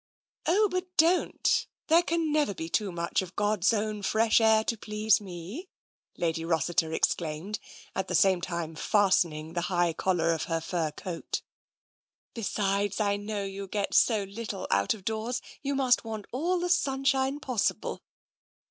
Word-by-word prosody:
" - - -72
Oh, 415 +6 +4
but 365 -1 -2
don't! 335 +3 +3 0.2
There 330 +2 +5
can 335 -2 0
never 295 -9 +1
be 160 -1 -5
too 205 +2 0
much 170 +1 -1
of 185 0 -9
God's 205 -1 +2
own 215 -1 -1
fresh 220 +3 +3
air 220 -1 +5
to 230 - -1
please 215 -1 +1
me," 195 - -8 0.5
Lady 165 -1 -1
Rossiter 165 0 +1
exclaimed, 165 +5 -1 0.4
at 190 -1 -1
the 180 - -1
same 190 0 +4
time 170 -3 -3
fastening 170 -4 +1
the 175 - -1
high 175 -2 +2
collar 170 -1 +1
of 160 - -2
her 165 -1 -1
fur 165 -1 -1
coat. 165 +2 -5 0.5
" - - -71
Besides, 200 -2 -1
I 200 -1 +2
know 205 0 -4
you 195 0 -5
get 200 +1 -2
so 220 -4 +4
little 200 0 -5
out 100 - +2
of 195 -3 -15
doors 225 +3 -2 0.2
you 280 0 -1
must 260 -2 +3
want 220 -3 -5
all 345 +8 0
the 355 +1 -1
sunshine 270 -4 +1
possible. 250 -7 -1
205 Hz, 165 wpm, -28 LUFS, 175-240 Hz, 0.5 s, There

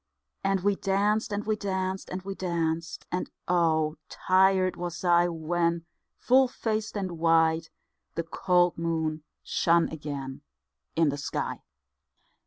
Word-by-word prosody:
And 195 -1 +1
we 200 +1 +2
danced, 205 +3 +1
and 205 +1 -2
we 215 0 +1
danced, 190 -2 -3
and 185 0 -5
we 195 +1 -4
danced, 165 -3 -2
And 180 - -2 0.2
oh! 160 -3 +2
tired 185 0 +3
was 175 0 -5
I 175 -1 +4
When, 170 0 -1 0.3
full 260 +1 +4
faced 220 -3 -3
and 185 -4 -4
white, 165 0 +3 0.5
the 165 - -1
cold 175 0 +2
moon 160 -2 -1 0.2
Shone 170 0 +2
again 140 -4 -6 0.5
in 160 -2 +3
the 145 - -2
sky. 140 - -3
175 Hz, 130 wpm, -28 LUFS, 165-195 Hz, 0.5 s, I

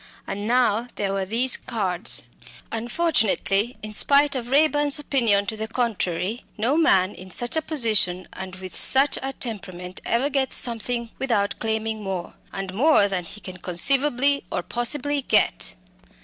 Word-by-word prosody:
And 205 +2 -5
now 240 -1 +2
there 195 -1 -2
were 195 -1 -1
these 235 +6 0
cards. 195 -8 -3 0.5
Unfortunately, 230 - +1
in 215 0 -6
spite 280 +5 +4
of 245 -2 -4
Raeburn's 290 +1 +3
opinion 235 -9 +2
to 220 +1 -3
the 220 0 -5
contrary, 220 -3 -2
no 235 +7 +1
man 195 - +3
in 185 +1 -12
such 240 - 0
a 320 - +1
position 215 - +2
and 190 0 -7
with 185 0 -9
such 270 +2 +4
a 270 - -3
temperament 185 -8 -7
ever 260 +5 0
gets 270 -1 +1
something 235 0 0
without 225 -6 0
claiming 220 0 -2
more 190 -3 -5 0.2
and 195 -1 -5
more 250 -1 +4
than 185 -3 -3
he 210 - -10
can 185 -3 -9
conceivably 275 +10 +2
or - - -2
possibly 280 - 0
get. - - +1
225 Hz, 150 wpm, -23 LUFS, 195-265 Hz, 0.5 s, spite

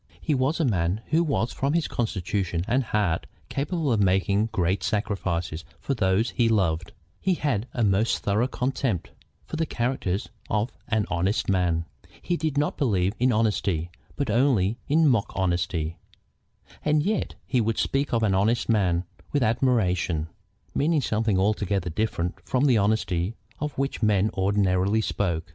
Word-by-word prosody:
He 155 - 0
was 135 +4 +1
a 160 - +2
man 95 -3 0
who 165 +2 +4
was 140 -7 0
from 140 +2 0
his 165 -2 +1
constitution 95 -5 -2
and 125 +2 +1
heart 100 -7 0 0.2
capable 145 +1 -1
of 110 - +1
making 100 +2 +2
great 95 -2 0
sacrifices 90 -6 -2 0.2
for 140 - -2
those 105 0 +1
he 115 -2 +2
loved. 90 -6 +1 0.3
He 185 -1 +1
had 125 -8 -1
a 120 - -1
most 105 +2 +2
thorough 105 +5 +2
contempt 125 - -2 0.3
for 160 - -5
the 160 0 0
character 120 -8 -1 0.3
of 110 +4 0 0.2
an 110 -2 +1
honest 95 +6 0
man. 90 -3 +1 0.3
He 175 - -1
did 155 -4 -2
not 145 +1 0
believe 100 -8 +2
in 125 +1 +3
honesty, 100 -7 0 0.2
but 140 -6 -1
only 115 -4 +2
in 160 +2 +4
mock 120 -7 +2
honesty. 85 -3 -1 0.8
And 150 0 +2
yet 210 +2 -1
he 125 - +1
would 115 0 0
speak 140 +1 0
of 115 -1 +1
an 100 -3 +3
honest 110 +5 +2
man 90 -6 +2 0.3
with 145 -3 +2
admiration, 95 - +1 0.4
meaning 155 +1 +2
something 110 -4 +1
altogether 100 -2 0
different 90 -2 -2
from 130 +2 +1
the 125 -6 +4
honesty 100 -2 0 0.2
of 150 -2 -4
which 135 -2 -2
men 105 -1 +3
ordinarily 95 +1 +2
spoke. 85 -6 -1
105 Hz, 155 wpm, -26 LUFS, 95-130 Hz, 0.8 s, who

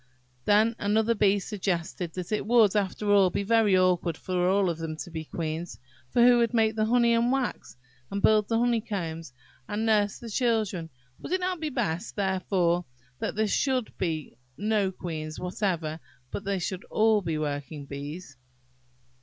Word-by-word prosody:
Then 215 +2 +4
another 220 +3 +2
Bee 205 -2 +3
suggested 180 -4 -3
that 180 +1 -5
it 210 -1 -1
would, 225 -4 +5
after 205 +1 0
all, 195 -2 +6
be 200 - -2
very 215 -2 +4
awkward 180 -3 +2
for - - -9
them 180 -1 +1 0.5
all 155 - -5
to 170 +3 -8
be 160 -1 -5
queens; 160 +1 -4 0.3
for 240 - +3
who 245 0 +6
would 235 +1 +1
make 220 -1 +3
the 215 -1 +1
honey 235 0 +4
and 235 +1 +2
wax, 265 - -2 0.3
and 200 - -3
build 215 0 +4
the 225 - +1
honeycombs, 200 - -1 0.4
and 215 +2 -1
nurse 210 -2 +2
the 235 -2 -9
children? 215 -8 0 0.3
Would - - -5
it 375 - +2
not 365 -1 -1
be 310 -1 -2
best, 200 - -2
therefore, 185 -3 +1 0.3
that - - -3
there 220 +1 +2
should 255 +2 0
be 160 -9 -3 0.2
no 205 -2 +1
queens 155 -4 -6
whatever, 180 -4 -2 0.3
but 200 - -5
that - - -3
they 200 - +1
should 185 +1 -4
all 220 -1 +3
be 165 -4 -2
working 145 0 -4
bees? 145 +2 -8
200 Hz, 170 wpm, -27 LUFS, 170-220 Hz, 0.5 s, all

